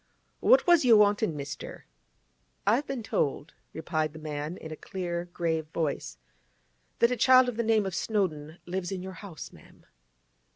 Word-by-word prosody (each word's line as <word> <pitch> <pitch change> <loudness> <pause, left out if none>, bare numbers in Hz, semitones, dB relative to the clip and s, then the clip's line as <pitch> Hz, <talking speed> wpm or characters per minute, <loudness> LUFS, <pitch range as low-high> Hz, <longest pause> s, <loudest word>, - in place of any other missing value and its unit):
'What - - +5
was 345 -4 +5
you 235 -4 +7
wantin', 205 -4 +3
mister?' 140 0 -7 0.8
'I 205 +3 +5
have 290 - -4
been 270 -4 -4
told,' 145 -5 -2 0.2
replied 155 -1 -2
the - - -10
man 155 +2 -5
in 160 - -9
a - - -5
clear, 175 0 -4
grave 165 -3 -2
voice, 150 - -3 0.8
'that 235 - +3
a - - +1
child 255 +2 +6
of 245 - -2
the 235 - 0
name 220 -2 +2
of 190 - -3
Snowdon 165 -7 -2
lives 180 0 -4
in 185 -2 -4
your 190 0 -7
house, 190 -7 -9
ma'am. - - -19
180 Hz, 170 wpm, -28 LUFS, 155-220 Hz, 0.8 s, you